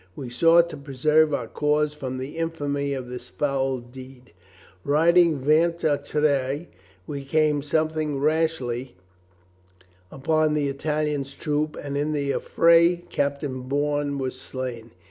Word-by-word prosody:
We 125 -3 -7
sought 165 +6 +5
to - - -7
preserve 150 +3 +2
our 135 -5 -1
cause 150 +3 0
from 130 -3 -5
the 130 +3 -6
infamy 145 -4 -2
of 130 -2 -6
this 125 0 -8
foul 135 -2 -1
deed. 125 0 -13 0.5
Riding 165 +2 +4
ventre 155 +4 +2
a - - +1
terre, 145 0 0 0.4
we 140 +4 -5
came 150 +1 +1
something 155 0 -1
rashly 135 - -1 1.2
upon 155 +2 +1
the 145 -2 0
Italian's 145 -1 -2
troop 150 0 -2
and 140 -1 -5
in 150 +2 -1
the 140 -2 -1
affray 170 +3 +3
Captain 140 -2 -2
Bourne 145 0 0
was 130 -1 -4
slain. 125 -4 -6
145 Hz, 130 wpm, -24 LUFS, 135-155 Hz, 1.2 s, sought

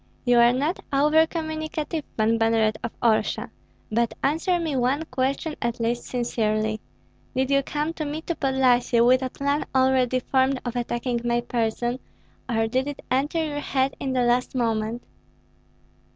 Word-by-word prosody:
"You 245 -1 +5
are 235 0 +6
not 290 +8 -1
over 300 +3 +4
communicative, 315 -1 -3
Pan 225 +1 +2
Banneret 225 -1 +3
of - - -3
Orsha; 225 -2 +1 0.4
but 235 +1 +1
answer 325 +5 +1
me 320 -4 -2
one 265 +5 +1
question 275 +3 -2
at 235 0 -2
least 235 +1 -1
sincerely: 215 -3 -1 0.5
Did 260 +1 0
you 275 0 +4
come 300 +3 -2
to 315 - -4
me, 300 +2 -4
to 340 - -2
Podlyasye, 255 -4 +2
with 255 +1 +5
a 260 - -2
plan 280 +3 -1
already 260 -1 +3
formed 265 +1 +1
of 245 0 -3
attacking 240 0 -2
my 240 0 +1
person, 240 +1 -1 0.5
or 225 -2 +1
did 255 +4 -1
it 290 - -6
enter 295 +5 +1
your 290 -1 -3
head 270 -1 0
in 265 -1 -2
the 250 -1 +2
last 245 +2 +1
moment?" 225 -1 -1
255 Hz, 160 wpm, -24 LUFS, 235-290 Hz, 0.5 s, are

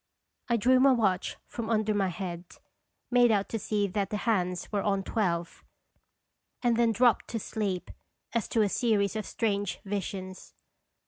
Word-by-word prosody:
I 235 - +3
drew 255 +4 +4
my 270 +1 +6
watch 195 -7 0
from 230 -2 -5
under 215 -1 +1
my 200 -2 +1
head, 175 -1 -5 0.7
made 245 -1 +5
out 205 -3 +1
to 225 - -2
see 205 0 0
that 200 +1 -1
the 210 - -2
hands. 180 -5 -1
were 205 -2 0
on 195 -1 0
twelve, 175 -6 -2 1.0
and 240 -1 +3
then 235 0 +3
dropped 240 +1 +3
to 225 - -3
sleep 200 -4 -3 0.4
as 235 -3 0
to 225 - +2
a - - +2
series 205 -3 +1
of 215 - -3
strange 205 -4 -1
visions. 190 -1 -5
210 Hz, 165 wpm, -29 LUFS, 190-230 Hz, 1.0 s, my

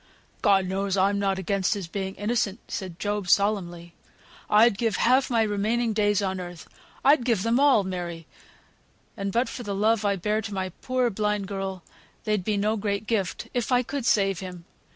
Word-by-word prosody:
"God 195 -4 +4
knows, 195 +1 -1
I'm 200 +1 +2
not 195 -1 0
against 195 +1 0
his 200 -3 -4
being 190 +2 -4
innocent," 210 -1 -1
said 185 -5 -5
Job, 205 -2 -2
solemnly. 175 -5 +1 0.6
"I'd 215 +1 +5
give 225 -3 +1
half 255 +3 +3
my 230 -3 +3
remaining 220 +3 0
days 205 -1 +2
on 190 -1 -2
earth, 175 -2 -8 0.4
I'd 280 -1 +5
give 230 -6 +1
them 230 +2 +2
all, 280 -7 +5
Mary 175 -3 -5 0.9
(and 200 -3 -3
but 240 +5 +1
for - - -6
the 205 -4 -4
love 215 +2 +2
I 200 -1 +2
bear 210 +4 -1
to 205 -2 -6
my 190 -1 -2
poor 255 -2 0
blind 210 -1 -1
girl, 195 -2 -4 0.4
they'd 210 -3 0
be 210 +1 0
no 210 +2 +1
great 200 0 -2
gift), 210 -5 -2
if 245 +1 -1
I 250 0 +4
could 270 -1 -4
save 195 -5 +2
him. 180 -3 -8
205 Hz, 185 wpm, -26 LUFS, 190-225 Hz, 0.9 s, I'd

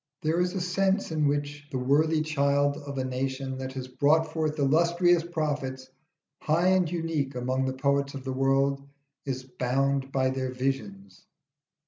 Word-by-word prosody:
There 160 +2 +1
is 180 +2 -1
a 190 - -1
sense 190 +2 0
in 155 -2 +1
which 145 0 -2
the 130 - -2
worthy 155 +5 +2
child 140 -2 +1
of 145 -2 -7
a 130 - 0
nation 130 +1 -3
that 130 0 -5
has 130 -1 -5
brought 145 +5 +3
forth 155 -1 -1
illustrious 170 +4 +3
prophets, 145 -6 -3 0.5
high 170 +4 +2
and 185 -3 +3
unique 160 -5 -2
among 130 +1 -1
the 130 - -1
poets 140 0 +1
of 135 - -7
the 130 0 -3
world, 135 +1 +2 0.5
is 130 -1 -3
bound 135 +2 -1
by 130 -1 +1
their 130 -1 -2
visions. 135 +11 -4
140 Hz, 160 wpm, -27 LUFS, 130-160 Hz, 0.5 s, brought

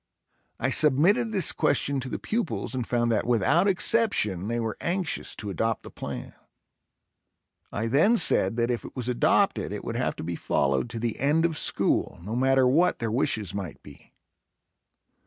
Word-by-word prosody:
I 130 +3 0
submitted 165 - +3
this 190 -6 +4
question 140 -1 0
to 130 0 -6
the - - -3
pupils 225 -10 -3
and 125 -3 -3
found 120 -1 0
that, 110 - +1
without 125 - +2
exception, 185 - +2
they 120 +1 -2
were 115 -2 -3
anxious 175 0 -2
to 105 -2 -6
adopt 110 +5 -2
the - - -10
plan. - - -7 1.4
I 105 - -3
then 155 - +3
said 95 - +2
that 120 +1 +1
if 120 - -3
it - - -11
was 125 -2 -4
adopted 125 -1 +1
it - - -6
would - - -5
have - - -1
to - - -7
be 85 +1 -4
followed 70 - 0
to 115 -1 -6
the 115 -1 -3
end 150 +5 +2
of 165 -2 -1
school, - - 0
no 105 +5 -5
matter 130 +1 +3
what 170 +8 +3
their 115 -3 -3
wishes 110 -5 -1
might 95 -6 -6
be. - - -16
125 Hz, 175 wpm, -26 LUFS, 115-160 Hz, 1.4 s, this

